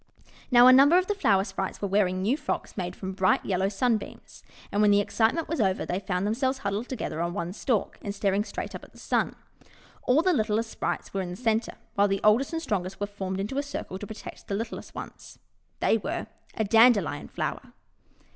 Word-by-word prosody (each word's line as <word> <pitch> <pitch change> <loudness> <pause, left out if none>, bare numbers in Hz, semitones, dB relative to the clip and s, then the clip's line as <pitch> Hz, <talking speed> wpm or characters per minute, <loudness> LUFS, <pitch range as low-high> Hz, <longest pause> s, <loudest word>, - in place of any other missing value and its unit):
Now, 245 -1 +7
a 255 - +9
number 280 +6 +7
of 365 - +3
the 415 - 0
Flower 200 - +3
Sprites 190 -1 -4
were 200 - -2
wearing 190 -2 +1
new 230 +7 +2
frocks 300 0 -4
made 180 -2 -4
of 190 -1 -6
bright 185 -1 +2
yellow 190 0 +1
Sun 225 +3 +2
beams. - - -12 0.3
And 205 - +1
when 210 - +5
the 205 0 +5
excitement 225 +9 +1
was 325 -5 -1
over 190 -2 +1
they 180 - -2
found 185 -1 -2
themselves 260 +5 0
huddled 205 +3 -3
together 215 -10 -3
on 170 0 -2
one 170 +1 -3
stalk 220 0 -1
and 200 0 -5
staring 200 0 +1
straight - - -6
up - - -8
at - - -15
the - - -17
Sun. - - 0 0.7
All 275 +6 +3
the 370 0 +3
littlest 220 -2 0
Sprites - - -3
were 195 - -1
in 180 - -4
the 175 - -5
centre, 225 0 0 0.2
while 200 0 +3
the 195 0 0
oldest 225 +8 +4
and 325 -1 -2
strongest 190 - -2
were 205 - 0
formed 195 -2 -5
into 210 +8 -2
a - - +2
circle 285 -9 -6
to 205 - -7
pro 220 - -7
tect - - -10
the 200 - -2
littlest 225 +2 -6
ones. - - -9 0.4
They 225 - +3
were 325 - -3 0.3
a 220 - 0
Dandelion 215 -8 +4
Flower! - - -4
210 Hz, 220 wpm, -27 LUFS, 195-250 Hz, 0.7 s, a